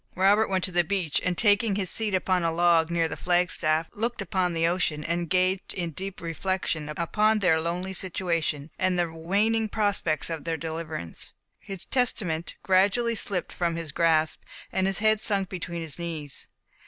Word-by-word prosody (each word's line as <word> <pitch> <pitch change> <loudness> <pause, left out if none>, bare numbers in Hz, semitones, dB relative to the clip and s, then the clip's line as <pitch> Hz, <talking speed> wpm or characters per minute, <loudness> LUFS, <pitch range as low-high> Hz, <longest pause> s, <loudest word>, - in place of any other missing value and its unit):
Robert 200 +4 +4
went 190 -2 0
to 185 - -2
the 175 0 +3
beach, 180 -4 0
and 180 -1 0
taking 205 -1 +3
his 195 -2 0
seat 210 +1 0
upon 185 -1 +1
a 165 - +1
log, 170 -1 +3
near 170 -1 +1
the 150 - -5
flag 180 0 +1
staff, 155 +1 +1
looked 235 +3 -2
upon 185 -2 0
the 165 0 +1
ocean, 165 -3 0
and 170 +3 -1
engaged 185 +2 0
in 175 -3 -2
deep 190 +5 -6
reflection 170 -2 -2
upon 210 +8 +1
their 180 -6 +3
lonely 180 +3 -3
situation, 165 -5 -1
and 185 -1 +1
the 170 -2 0
waning 210 +7 +1
prospects 200 -7 0
of 160 -2 -4
their 165 -1 -2
deliverance. 160 - -5 0.3
His 195 -2 -7
Testament 180 -10 -1
gradually 200 +5 +3
slipped 195 -4 -3
from 170 -1 -1
his 165 -3 -5
grasp, 160 0 +2 0.3
and 190 0 +1
his 195 -1 +1
head 215 0 +3
sunk 200 -3 +2
between 170 -2 -5
his 160 +1 -5
knees. 160 -5 -5
180 Hz, 180 wpm, -26 LUFS, 165-195 Hz, 0.3 s, Robert